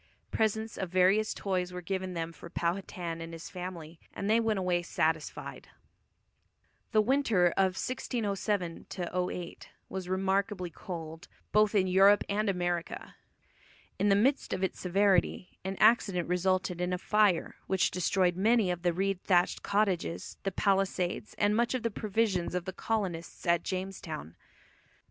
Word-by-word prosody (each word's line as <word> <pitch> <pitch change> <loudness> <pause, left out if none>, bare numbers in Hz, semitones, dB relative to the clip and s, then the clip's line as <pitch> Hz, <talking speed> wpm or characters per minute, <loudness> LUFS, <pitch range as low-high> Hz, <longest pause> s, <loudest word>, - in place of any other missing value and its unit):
Presents 220 +1 -1
of 190 - -2
various 185 +4 +3
toys 185 -2 -2
were 180 - -5
given 185 0 -3
them 165 0 -3
for 170 - -11
Powhatan 170 -1 -3
and 165 0 -7
his 165 0 -8
family, 175 -3 -7 0.2
and 200 - -3
they 220 +2 +4
went 225 -2 +1
away 180 -2 +1
satisfied. 160 -2 -2 1.2
The 215 -2 +4
winter 230 -8 +3
of 190 -1 +2
1607 205 -8 -2
08 180 -1 -4 0.2
was 185 -2 -5
remarkably 190 -1 0
cold, 165 -1 -7 0.2
both 215 0 +4
in 190 -2 +4
Europe 195 +2 +5
and 210 +1 0
America. 175 -2 -2 0.8
In 205 - +3
the 195 - +5
midst 260 +8 +2
of 185 - -2
its 190 - -1
severity 190 -1 +1
an 190 +1 -4
accident 205 -6 +4
resulted 180 0 0
in 180 0 0
a - - 0
fire 205 -2 +2
which 190 -2 +2
destroyed 180 0 +1
many 215 0 +3
of 175 -1 -4
the 175 -1 +1
reed 195 +1 -1
thatched 180 -2 +2
cottages, 185 - -1
the 195 - -2
palisades, 195 -1 0
and 205 0 +2
much 235 +2 +1
of 255 - -3
the 230 - 0
provisions 200 -4 0
of 180 -1 -2
the 190 - -5
colonists 190 -7 -3
at 170 -1 +3
Jamestown. 180 - -5
185 Hz, 150 wpm, -30 LUFS, 175-205 Hz, 1.2 s, Europe